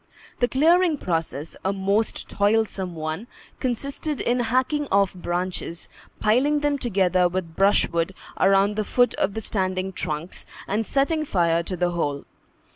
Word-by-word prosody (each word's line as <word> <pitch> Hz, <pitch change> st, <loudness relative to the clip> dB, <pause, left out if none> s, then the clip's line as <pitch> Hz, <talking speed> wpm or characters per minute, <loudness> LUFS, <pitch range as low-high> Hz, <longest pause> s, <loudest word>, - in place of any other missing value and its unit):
The 245 Hz, -, +3 dB
clearing 325 Hz, +5 st, +3 dB
process 165 Hz, -, -3 dB
a 190 Hz, -, +1 dB
most 200 Hz, +3 st, 0 dB
toilsome 200 Hz, -3 st, 0 dB
one 155 Hz, +7 st, -4 dB, 0.3 s
consisted 275 Hz, +4 st, -2 dB
in 245 Hz, +1 st, +1 dB
hacking 255 Hz, +5 st, +1 dB
off 200 Hz, -1 st, +3 dB
branches, 175 Hz, -1 st, -3 dB, 0.3 s
piling 275 Hz, +7 st, +3 dB
them 290 Hz, -1 st, +1 dB
together 185 Hz, -6 st, +2 dB
with 175 Hz, -3 st, -4 dB
brushwood 190 Hz, -3 st, +2 dB, 0.2 s
around 195 Hz, +2 st, +4 dB
the 215 Hz, -, +1 dB
foot 245 Hz, +3 st, +2 dB
of 195 Hz, -, 0 dB
the 220 Hz, -, -2 dB
standing 190 Hz, -2 st, -2 dB
trunks, 160 Hz, -1 st, -4 dB, 0.2 s
and 215 Hz, +2 st, -1 dB
setting 305 Hz, +3 st, +1 dB
fire 170 Hz, -, +2 dB
to 180 Hz, +2 st, -5 dB
the 175 Hz, 0 st, +1 dB
whole. 145 Hz, -5 st, -2 dB
195 Hz, 140 wpm, -24 LUFS, 180-245 Hz, 0.3 s, around